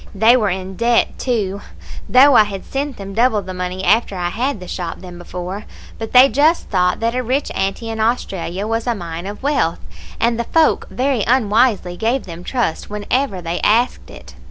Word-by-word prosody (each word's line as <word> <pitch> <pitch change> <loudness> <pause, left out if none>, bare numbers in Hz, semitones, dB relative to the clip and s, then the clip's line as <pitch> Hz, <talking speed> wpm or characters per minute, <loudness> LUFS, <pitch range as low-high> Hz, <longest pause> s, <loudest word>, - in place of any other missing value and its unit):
They 225 +5 +5
were 215 -5 +2
in 190 0 -5
debt, 235 0 +1
too, 205 -6 -1 0.5
though 275 +3 +7
I 215 - +7
had 195 -2 -7
sent 275 -1 -4
them 195 0 -8
double 220 -1 +2
the 185 0 -7
money 180 +1 -4
after 205 +2 +2
I 175 -1 -1
had 250 +5 -2
the 180 - -10
shop 175 -2 -5
than 180 -2 -10
before; 180 +4 -6 0.3
but 225 -1 -5
they 255 +1 +8
just 305 +5 +2
thought 180 -2 +1
that 230 +1 0
a 255 - -1
rich 260 +4 -1
auntie 195 +4 -2
in 220 - -5
Australia 200 -5 -1
was 225 +2 -2
a 240 - +1
mine 170 -1 -6
of 205 +5 -8
wealth, 275 - 0 0.4
and 235 0 +1
the 235 - -1
folk 320 +4 +2
very 255 -4 0
unwisely 220 -6 +2
gave 235 +6 0
them 170 -1 -9
trust 240 -7 -2
whenever 210 -1 -2
they 170 +1 -3
asked 235 +4 +1
it. - - -13
215 Hz, 195 wpm, -18 LUFS, 185-250 Hz, 0.5 s, they